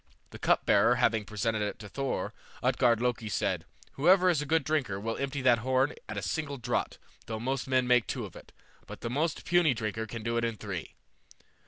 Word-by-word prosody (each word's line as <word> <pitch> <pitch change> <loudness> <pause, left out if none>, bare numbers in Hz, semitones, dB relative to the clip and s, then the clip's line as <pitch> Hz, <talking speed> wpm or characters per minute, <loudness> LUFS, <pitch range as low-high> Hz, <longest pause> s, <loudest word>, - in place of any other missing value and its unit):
The - - -10
cupbearer 115 +5 +4
having 115 -4 +2
presented 110 +1 -1
it 105 -1 -2
to 105 - -9
Thor, 135 +5 -3 0.3
Utgard 120 -2 +3
Loki 120 -3 -1
said, 95 -5 -1 0.3
"Whoever 180 +5 +5
is 155 -4 +1
a 150 - -5
good 160 0 +2
drinker 135 -10 -1
will 115 +2 -3
empty 140 0 -3
that 120 -2 +5
horn 130 +3 +1 0.2
at 110 - -4
a 100 - -3
single 140 +8 -2
draught, 120 - -2 0.3
though 110 -1 -4
most 130 +3 -2
men 130 -1 +2
make 125 -2 +3
two - - -3
of - - -11
it, - - -13 0.4
but - - -9
the 115 - -3
most 155 +5 -1
puny 170 -6 +4
drinker 110 0 -3
can 115 +1 -6
do 115 +1 -1
it 115 - 0
in 115 -1 -1
three." 95 -6 -6
120 Hz, 205 wpm, -30 LUFS, 110-135 Hz, 0.4 s, Whoever